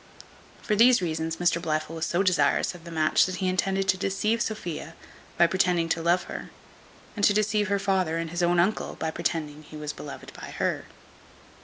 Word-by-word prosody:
For 210 Hz, -, +1 dB
these 240 Hz, +3 st, +6 dB
reasons 160 Hz, -2 st, -2 dB
Mr 170 Hz, -1 st, +1 dB
Blifil 155 Hz, -1 st, -2 dB
was 160 Hz, -1 st, -2 dB
so 175 Hz, +3 st, +1 dB
desirous 185 Hz, -1 st, +2 dB
of 175 Hz, -1 st, -13 dB
the 170 Hz, -, -8 dB
match 155 Hz, +1 st, +3 dB
that 185 Hz, -, -4 dB
he 190 Hz, -, -1 dB
intended 190 Hz, +1 st, 0 dB
to 190 Hz, -, +4 dB
deceive 205 Hz, +4 st, 0 dB
Sophia, 175 Hz, -8 st, -4 dB, 0.4 s
by 170 Hz, -, +6 dB
pretending 175 Hz, -1 st, +1 dB
love 170 Hz, +2 st, +2 dB
to -, -, -12 dB
her; -, -, -6 dB, 0.7 s
and 205 Hz, -, -4 dB
to 205 Hz, -, +5 dB
deceive 210 Hz, 0 st, +1 dB
her 200 Hz, +1 st, +1 dB
father 190 Hz, -4 st, 0 dB
and 165 Hz, -1 st, -3 dB
his 175 Hz, +1 st, -2 dB
own 175 Hz, 0 st, +3 dB
uncle, 190 Hz, +5 st, 0 dB
by 160 Hz, -, -3 dB
pretending 160 Hz, -3 st, -3 dB
he 155 Hz, 0 st, -11 dB
was 150 Hz, 0 st, -5 dB
beloved 145 Hz, -, -9 dB
by -, -, -9 dB
her. -, -, -1 dB
175 Hz, 195 wpm, -26 LUFS, 165-195 Hz, 0.7 s, these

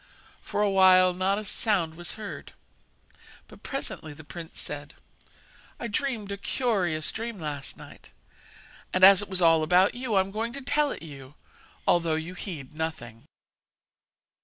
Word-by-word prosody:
For 210 Hz, -, -1 dB
a 205 Hz, -, +3 dB
while 185 Hz, -1 st, +6 dB
not 190 Hz, +2 st, 0 dB
a 215 Hz, -, -5 dB
sound 190 Hz, -6 st, +1 dB
was 175 Hz, +1 st, -6 dB
heard, 215 Hz, -2 st, -8 dB, 0.9 s
but -, -, -16 dB
presently 160 Hz, -, -6 dB
the 155 Hz, -, -12 dB
prince 165 Hz, +2 st, -8 dB
said: 145 Hz, +1 st, -4 dB, 0.8 s
'I 235 Hz, -, -3 dB
dreamed 225 Hz, -4 st, -2 dB
a 200 Hz, -, -3 dB
curious 190 Hz, -10 st, 0 dB
dream 225 Hz, -2 st, -5 dB
last 145 Hz, -3 st, -5 dB
night, -, -, -13 dB, 0.8 s
and 185 Hz, -, 0 dB
as 195 Hz, 0 st, +9 dB
it 205 Hz, -, -7 dB
was 185 Hz, -2 st, +2 dB
all 165 Hz, -1 st, +6 dB
about 180 Hz, +5 st, +4 dB
you 245 Hz, -3 st, -2 dB
I 190 Hz, -, +6 dB
am 190 Hz, +1 st, -5 dB
going 225 Hz, +3 st, -3 dB
to 280 Hz, -, -6 dB
tell 290 Hz, +2 st, +2 dB
it -, -, -6 dB
you, 140 Hz, -3 st, -11 dB, 0.5 s
although 170 Hz, -2 st, +2 dB
you 160 Hz, +3 st, -4 dB
heed 165 Hz, -9 st, -7 dB
nothing.' 155 Hz, -8 st, -5 dB
185 Hz, 160 wpm, -27 LUFS, 160-210 Hz, 0.9 s, as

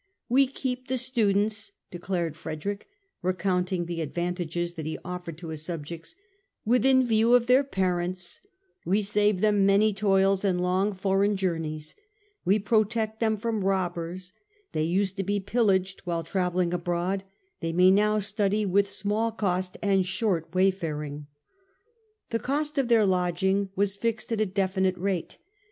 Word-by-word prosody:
" -, -, -55 dB
We 275 Hz, -1 st, +6 dB
keep 255 Hz, -1 st, -4 dB
the 260 Hz, -, 0 dB
students," 215 Hz, -4 st, 0 dB, 0.2 s
declared 175 Hz, -3 st, -3 dB
Frederick, 165 Hz, +5 st, -5 dB, 0.3 s
recounting 180 Hz, -1 st, 0 dB
the 170 Hz, -1 st, -4 dB
advantages 175 Hz, +1 st, -3 dB
that 160 Hz, -3 st, -6 dB
he 160 Hz, -, -3 dB
offered 180 Hz, -3 st, -6 dB
to 165 Hz, -1 st, -8 dB
his 155 Hz, -1 st, -4 dB
subjects, 165 Hz, -, -6 dB, 0.3 s
" 395 Hz, -, -51 dB
within 260 Hz, +3 st, +4 dB
view 230 Hz, +1 st, +4 dB
of 245 Hz, -1 st, +4 dB
their 255 Hz, +3 st, +5 dB
parents: 185 Hz, -6 st, -2 dB, 0.4 s
we 200 Hz, +5 st, +1 dB
save 205 Hz, -1 st, +2 dB
them 210 Hz, -2 st, +3 dB
many 200 Hz, +2 st, +4 dB
toils 195 Hz, -1 st, +2 dB
and 185 Hz, -3 st, +1 dB
long 185 Hz, +3 st, +1 dB
foreign 195 Hz, +2 st, +1 dB
journeys: 160 Hz, -5 st, -3 dB, 0.5 s
we 195 Hz, +3 st, +3 dB
protect 220 Hz, +1 st, 0 dB
them 220 Hz, -2 st, +1 dB
from 220 Hz, -1 st, -2 dB
robbers; 180 Hz, -1 st, -2 dB, 0.4 s
they 155 Hz, -, -1 dB
used 190 Hz, +3 st, 0 dB
to 195 Hz, -, -1 dB
be 205 Hz, +2 st, 0 dB
pillaged 195 Hz, -3 st, +1 dB
while 170 Hz, -2 st, -2 dB
travelling 180 Hz, 0 st, 0 dB
abroad; 175 Hz, +2 st, -1 dB, 0.4 s
they 165 Hz, -1 st, -2 dB
may 180 Hz, +2 st, +5 dB
now 210 Hz, +2 st, +3 dB
study 205 Hz, 0 st, 0 dB
with 200 Hz, +1 st, +2 dB
small 210 Hz, +3 st, 0 dB
cost 185 Hz, -4 st, -1 dB
and 195 Hz, -2 st, +2 dB
short 190 Hz, -4 st, -1 dB
wayfaring." 155 Hz, -6 st, -1 dB, 1.0 s
The 230 Hz, -, 0 dB
cost 290 Hz, +5 st, -1 dB
of 265 Hz, -, +1 dB
their 230 Hz, -3 st, +4 dB
lodging 190 Hz, +1 st, +1 dB
was 200 Hz, 0 st, +1 dB
fixed 230 Hz, +1 st, -2 dB
at 220 Hz, -1 st, 0 dB
a 215 Hz, -, +2 dB
definite 190 Hz, -1 st, 0 dB
rate. 185 Hz, -2 st, -2 dB
195 Hz, 150 wpm, -27 LUFS, 180-210 Hz, 1.0 s, We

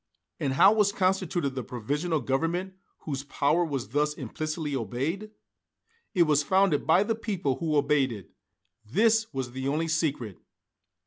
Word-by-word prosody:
And 140 Hz, -4 st, -1 dB
how 195 Hz, +9 st, +6 dB
was 210 Hz, -2 st, +3 dB
constituted 185 Hz, -6 st, 0 dB
the 130 Hz, -1 st, -4 dB
Provisional 145 Hz, +8 st, -2 dB
Government 165 Hz, +9 st, -1 dB, 0.3 s
whose 140 Hz, -3 st, -4 dB
power 145 Hz, +4 st, +1 dB
was 140 Hz, -9 st, -3 dB
thus 150 Hz, +4 st, 0 dB
implicitly 155 Hz, +2 st, -4 dB
obeyed? 135 Hz, -, -3 dB, 0.9 s
It 175 Hz, -, +6 dB
was 150 Hz, -2 st, +3 dB
founded 185 Hz, -2 st, +2 dB
by 175 Hz, +5 st, +5 dB
the 225 Hz, -, 0 dB
people 190 Hz, -, -2 dB
who 155 Hz, -3 st, 0 dB
obeyed 140 Hz, -2 st, +2 dB
it. 105 Hz, -5 st, -9 dB, 0.5 s
This 220 Hz, -, +2 dB
was 130 Hz, -3 st, -4 dB
the 130 Hz, +1 st, -4 dB
only 155 Hz, +4 st, 0 dB
secret. 145 Hz, -, -1 dB
150 Hz, 145 wpm, -27 LUFS, 135-180 Hz, 0.9 s, how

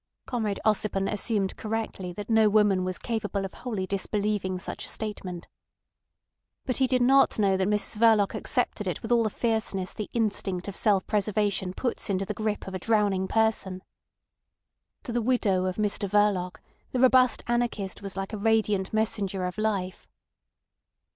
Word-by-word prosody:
Comrade 220 Hz, -5 st, -2 dB
Ossipon 205 Hz, -2 st, +1 dB
assumed 205 Hz, -2 st, 0 dB
correctly 215 Hz, -4 st, -4 dB
that 205 Hz, +4 st, -7 dB
no 220 Hz, -2 st, +4 dB
woman 205 Hz, -3 st, +3 dB
was 185 Hz, 0 st, -3 dB
capable 205 Hz, -4 st, -2 dB
of 190 Hz, -, -7 dB
wholly 215 Hz, -7 st, -4 dB
disbelieving 200 Hz, 0 st, -1 dB
such 180 Hz, -, -5 dB
a -, -, -6 dB
statement. 185 Hz, -5 st, -5 dB, 1.2 s
But 255 Hz, -, -1 dB
he 265 Hz, -, +3 dB
did 250 Hz, -1 st, +2 dB
not 270 Hz, +2 st, +4 dB
know 200 Hz, -3 st, +3 dB
that 190 Hz, 0 st, +1 dB
Mrs 210 Hz, +1 st, -1 dB
Verloc 220 Hz, -3 st, +4 dB
accepted -, -, -1 dB
it -, -, -3 dB
with 225 Hz, -, -5 dB
all 240 Hz, -1 st, +5 dB
the 220 Hz, -, +1 dB
fierceness 215 Hz, -4 st, -1 dB
the 210 Hz, -, -5 dB
instinct 200 Hz, -5 st, -1 dB
of 200 Hz, -, -5 dB
self 200 Hz, -3 st, +2 dB
preservation 205 Hz, -3 st, 0 dB
puts 245 Hz, -3 st, -2 dB
into 195 Hz, 0 st, 0 dB
the 210 Hz, -, -3 dB
grip 215 Hz, 0 st, -2 dB
of 190 Hz, -, -6 dB
a 185 Hz, -, -3 dB
drowning 200 Hz, -2 st, +1 dB
person. 215 Hz, -4 st, 0 dB, 1.2 s
To 245 Hz, -, -5 dB
the 240 Hz, 0 st, 0 dB
widow 215 Hz, -6 st, +1 dB
of 185 Hz, -1 st, -1 dB
Mr 205 Hz, -1 st, -1 dB
Verloc 190 Hz, -4 st, +1 dB, 0.3 s
the 255 Hz, -, -1 dB
robust 255 Hz, -1 st, +5 dB
anarchist 235 Hz, -6 st, -1 dB
was 195 Hz, -1 st, -7 dB
like 195 Hz, +3 st, -4 dB
a -, -, -2 dB
radiant 210 Hz, -2 st, +1 dB
messenger 200 Hz, -4 st, 0 dB
of 180 Hz, +3 st, -4 dB
life. 195 Hz, -4 st, -2 dB
210 Hz, 165 wpm, -27 LUFS, 190-225 Hz, 1.2 s, all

